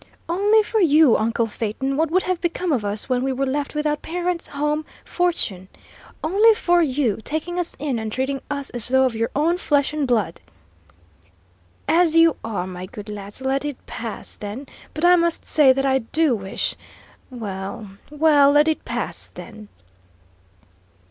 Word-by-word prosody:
"Only 410 +5 +3
for 440 +1 -1
you, 310 - +5
uncle 230 +1 +1
Phaeton, 225 +5 -3
what 320 +2 +1
would 370 +3 +2
have 365 -2 -2
become 345 0 -1
of 250 -7 +1
us 205 +1 -2
when 250 -1 0
we 265 +1 0
were 270 +1 -1
left 280 +2 -3
without 300 0 -1
parents, 350 0 -3
home, 300 +2 -1 0.2
fortune? 280 - -1 0.6
Only 415 +8 +5
for 350 -3 +2
you, 265 - +1
taking 320 +6 -3
us 350 - -3
in 275 -5 -2
and 220 -1 -4
treating 265 +3 -2
us 280 -2 -4
as 240 -3 -3
though 265 +1 +3
of 255 - 0
your 225 +1 -1
own 330 +5 +1
flesh 290 -4 +1
and 300 -3 -1
blood 215 -9 0 0.8
" - - -35 0.7
"As 335 -1 +3
you 330 -2 +6
are, 205 -5 -3
my 185 0 -7
good 210 +2 -10
lads! 205 +3 -8
Let 270 +1 0
it 290 -3 -4
pass, 225 -2 -6
then, 210 +7 -7 0.3
but 310 +3 0
I 355 0 +7
must 340 -1 0
say 290 -4 +5
that 270 +1 0
I 265 0 +3
do 280 +3 +1
wish 195 -2 -3 0.5
well, 200 -3 -6 0.2
well, 295 -2 +4
let 295 +1 +5
it 315 - 0
pass, - - -3
then!" 215 -1 -11
280 Hz, 175 wpm, -22 LUFS, 230-325 Hz, 0.8 s, I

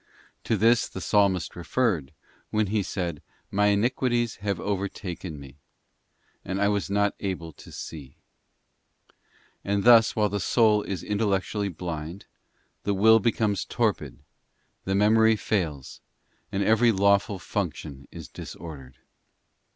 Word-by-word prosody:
To - - +1
this 115 +1 +3
the - - -7
Psalmist 100 -2 +1
referred 90 - -1 0.4
when 110 0 +1
he 110 - +2
said, 90 -5 -4 0.3
'My 105 +1 +3
iniquities 120 +2 +1
have 100 -2 -2
overtaken 95 -5 -4
me, 70 0 -13 0.9
and 95 +1 -3
I 100 0 +3
was 100 -1 -1
not 100 0 +1
able 90 -5 -4
to - - -14
see.${ 70 -5 -9 1.5
And 100 0 0
thus, 115 -2 +6
while 105 -1 +2
the 100 +1 -2
soul 105 +1 +3
is 95 -3 -5
intellectually 100 -1 -1
blind, 85 0 -6 0.6
the 100 - -1
will 110 +3 +6
becomes 105 -3 0
torpid, - - -1 0.7
the 95 - 0
memory 110 +2 +4
fails, 80 - -3 0.5
and 100 +1 0
every 110 +3 +4
lawful 100 0 +2
function 80 -7 -5
is 85 -3 -9
disordered. 70 -6 -10
100 Hz, 125 wpm, -26 LUFS, 85-105 Hz, 1.5 s, thus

